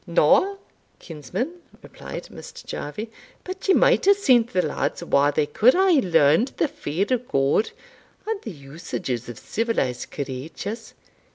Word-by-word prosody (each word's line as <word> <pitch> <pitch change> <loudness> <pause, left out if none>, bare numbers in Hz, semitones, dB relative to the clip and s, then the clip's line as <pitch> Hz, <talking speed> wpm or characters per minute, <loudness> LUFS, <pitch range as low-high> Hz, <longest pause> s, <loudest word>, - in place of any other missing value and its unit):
"Na, 400 -5 +3 0.4
kinsman," 185 - -5 0.2
replied - - -8
Mr. - - -11
Jarvie, 210 +10 -6 0.3
"but 375 +2 -7
ye 385 - +5
might - - +4
hae 400 - +7
sent 250 - +3
the 180 -4 +1
lads - - -2
whar 145 -3 +3
they 145 +1 +1
could 220 - +4
hae 365 -6 +4
learned 165 - +4
the - - +2
fear 175 - -3
o' 250 - +3
God, 140 - +1 0.6
and 440 -2 -3
the - - -7
usages 140 - -6
of 120 - -8
civilised 205 - -2
creatures. 145 - -6
190 Hz, 145 wpm, -23 LUFS, -, 0.6 s, hae